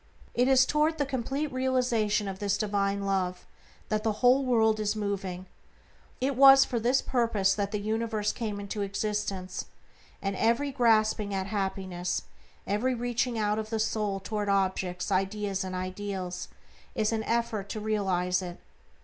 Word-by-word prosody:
It 245 +1 +2
is 260 -1 +6
toward 305 +3 +1
the 290 - +1
complete 270 +2 -2
realization 250 -5 +1
of 190 -1 -5
this 205 -1 0
divine 200 -1 0
Love 185 -2 -1 0.4
that 215 0 0
the 220 -2 +1
whole 260 +3 +6
world 220 -4 +3
is 210 0 0
moving; 195 -3 -3 0.7
it 270 +1 0
was 270 +1 +8
for 240 - -2
this 245 +4 +2
purpose 225 -6 +2
that 200 -1 -1
the 210 - -1
universe 215 0 -1
came 215 -4 -4
into 200 +1 -4
existence, 200 -2 -3 0.5
and 195 0 -2
every 235 +6 +2
grasping 215 -5 +2
at 190 -1 -1
happiness, 190 -3 -2 0.4
every 240 +6 0
reaching 240 0 -1
out 210 0 +1
of 215 0 -5
the 225 - -1
soul 215 -2 -1
toward 205 +1 -3
objects, 190 -1 0
ideas 195 +1 0
and 185 -1 -5
ideals, 185 -1 -4 0.5
is 215 0 +1
an 225 -1 0
effort 230 -4 -1
to 215 - -4
realize 190 -4 0
it. 175 -1 -7
210 Hz, 155 wpm, -28 LUFS, 195-235 Hz, 0.7 s, was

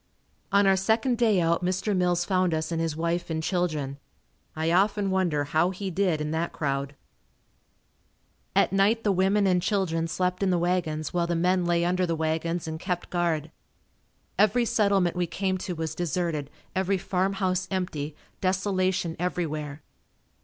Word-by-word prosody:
On 200 0 +4
our 195 0 +5
second 225 +5 +1
day 220 -5 +4
out 170 +1 +1
Mr. 190 +3 0
Mills 175 -1 +1
found 185 -3 +1
us 160 +1 -3
and 165 -1 -1
his 165 -2 -1
wife 170 +2 -1
and 160 0 -2
children. 155 -7 -1 0.6
I 160 +1 0
often 200 +2 +2
wonder 175 -6 +1
how 155 +5 +2
he 190 +1 -4
did 180 -3 +1
in 150 0 -2
that 165 +2 -2
crowd. 140 -1 -2 1.6
At - - +3
night 205 +4 +3
the 205 - +3
women 195 +2 +2
and 180 -2 +3
children 170 -5 0
slept 180 +2 -1
in 195 - +2
the 180 - +2
wagons 170 -3 -1
while 175 -1 +1
the 170 - 0
men 180 +1 +2
lay 170 0 +2
under 180 +1 +1
the 165 - 0
wagons 160 +2 -1
and 160 0 -4
kept 180 -1 -3
guard. 165 -3 0 0.9
Every 215 +4 +4
settlement 200 -6 +2
we 180 -1 0
came 190 +1 -1
to 180 -1 -4
was 160 -1 -3
deserted, 165 -4 -2 0.3
every 190 +1 +1
farm 190 +1 0
house 185 -1 -1
empty, 160 -6 -3 0.3
desolation 185 -2 0
everywhere. 155 -4 -3
180 Hz, 165 wpm, -26 LUFS, 160-190 Hz, 1.6 s, our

